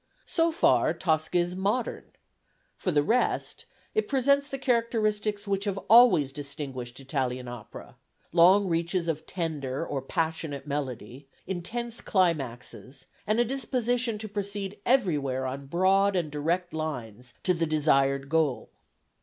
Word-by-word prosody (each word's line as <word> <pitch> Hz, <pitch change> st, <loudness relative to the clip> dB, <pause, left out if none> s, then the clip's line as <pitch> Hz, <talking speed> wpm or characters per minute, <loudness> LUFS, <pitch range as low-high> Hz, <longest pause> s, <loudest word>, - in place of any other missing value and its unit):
So 330 Hz, -1 st, +2 dB
far 325 Hz, -, +3 dB
Tosca 160 Hz, 0 st, 0 dB
is 175 Hz, +1 st, 0 dB
modern; 205 Hz, +6 st, -1 dB, 0.7 s
for -, -, -3 dB
the 150 Hz, -4 st, +3 dB
rest 235 Hz, +11 st, 0 dB, 0.3 s
it 435 Hz, -, 0 dB
presents 280 Hz, +1 st, +2 dB
the 275 Hz, -, -4 dB
characteristics 215 Hz, -4 st, 0 dB
which 200 Hz, +1 st, -1 dB
have 200 Hz, -2 st, -1 dB
always 200 Hz, -, +7 dB
distinguished 140 Hz, -4 st, -6 dB
Italian 130 Hz, -2 st, -2 dB
opera 120 Hz, -3 st, -10 dB, 0.3 s
long 185 Hz, +4 st, +6 dB
reaches 170 Hz, +1 st, -1 dB
of 160 Hz, -1 st, -3 dB
tender 155 Hz, -5 st, -3 dB
or 140 Hz, -4 st, -3 dB
passionate 160 Hz, -2 st, -3 dB
melody, 135 Hz, -2 st, -5 dB, 0.2 s
intense 225 Hz, +6 st, -4 dB
climaxes, 135 Hz, -, -1 dB, 0.2 s
and 215 Hz, +2 st, +2 dB
a 240 Hz, -, +4 dB
disposition 245 Hz, -2 st, 0 dB
to 215 Hz, +1 st, -6 dB
proceed 200 Hz, -1 st, -4 dB
everywhere 150 Hz, -, +1 dB
on 135 Hz, +2 st, -5 dB
broad 190 Hz, +5 st, +3 dB
and 170 Hz, -5 st, -1 dB
direct 170 Hz, +5 st, -1 dB
lines 125 Hz, -7 st, -5 dB
to 185 Hz, -, +3 dB
the 165 Hz, -1 st, -1 dB
desired 140 Hz, -3 st, +2 dB
goal." 155 Hz, -3 st, 0 dB
170 Hz, 130 wpm, -27 LUFS, 140-210 Hz, 0.7 s, always